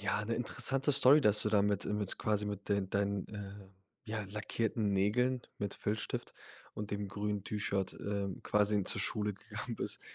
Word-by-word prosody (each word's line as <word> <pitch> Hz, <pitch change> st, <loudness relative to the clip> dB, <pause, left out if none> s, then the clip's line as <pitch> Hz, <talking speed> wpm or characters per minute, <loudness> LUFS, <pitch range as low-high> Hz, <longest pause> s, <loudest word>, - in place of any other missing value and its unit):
ja, 100 Hz, +1 st, -1 dB
'ne 115 Hz, +1 st, -1 dB
interessante 135 Hz, +4 st, +3 dB
Story, 140 Hz, +2 st, +7 dB
dass 105 Hz, -4 st, +5 dB
du 105 Hz, -, +1 dB
da 105 Hz, -2 st, +3 dB
mit, 100 Hz, -1 st, +1 dB
äh -, -, -2 dB
mit 105 Hz, -2 st, -1 dB
quasi 105 Hz, -1 st, 0 dB
mit 100 Hz, 0 st, -5 dB
den 100 Hz, -2 st, 0 dB
deinen, 100 Hz, -1 st, 0 dB
äh, 100 Hz, -1 st, -8 dB, 0.4 s
ja 110 Hz, 0 st, -3 dB
lackierten 105 Hz, +1 st, -1 dB
Nägeln 125 Hz, +6 st, +2 dB, 0.2 s
mit 100 Hz, -1 st, -3 dB
Filzstift 105 Hz, +1 st, -3 dB, 0.4 s
und 105 Hz, -1 st, -5 dB
dem 100 Hz, -1 st, -3 dB
grünen 105 Hz, 0 st, -3 dB
T-Shirt, 100 Hz, -2 st, -2 dB
äh, 100 Hz, -1 st, -3 dB
quasi 105 Hz, -1 st, +2 dB
zur 100 Hz, -, 0 dB
Schule 105 Hz, 0 st, 0 dB
gegangen 110 Hz, +3 st, -7 dB
bist. -, -, -3 dB
105 Hz, 175 wpm, -33 LUFS, 100-110 Hz, 0.4 s, Story